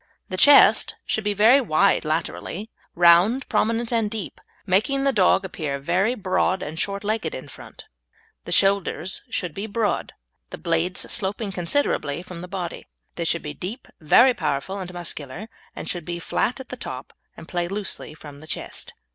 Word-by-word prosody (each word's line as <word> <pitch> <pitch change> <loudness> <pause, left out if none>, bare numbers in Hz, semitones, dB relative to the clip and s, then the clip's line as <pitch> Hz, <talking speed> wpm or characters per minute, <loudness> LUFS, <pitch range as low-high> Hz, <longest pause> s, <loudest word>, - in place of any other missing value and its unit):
The 185 - -3
chest 285 +9 +6
should 220 - -1
be 205 0 0
very 230 +7 +6
wide 195 -4 +2
laterally, 170 +6 -3 0.2
round, 175 +9 +5
prominent, 230 +2 0
and 225 -2 +1
deep, 210 -5 -6 0.2
making 215 +9 +2
the 275 -1 +2
dog 190 -1 +3
appear 155 -6 -4
very 180 - +1
broad 185 -2 0
and 155 +2 -6
short 200 +2 -2
legged 210 -6 -2
in 130 - -8
front. - - -13 0.6
The - - -7
shoulders 195 -2 +2
should 175 -4 -3
be 200 +6 -5
broad, 220 0 -1 0.4
the - - -7
blades 170 +2 0
sloping 205 0 -2
considerably 175 - -1
from 180 -2 -9
the 180 - -7
body; 180 -2 -5 0.3
they 170 - -3
should 170 +1 0
be 150 - -5
deep, 210 - -7
very 240 - +6
powerful, 190 - -2
and 180 -1 -6
muscular, 175 +1 -4 0.3
and - - -7
should 175 -2 -3
be 175 -1 -4
flat 230 +8 -1
at 265 - -9
the 255 - -6
top 130 - -7 0.2
and 165 - -11
play 175 -1 -2
loosely 195 -5 -4
from 145 -2 -12
the 155 - -13
chest. - - -6
185 Hz, 170 wpm, -23 LUFS, 170-215 Hz, 0.6 s, chest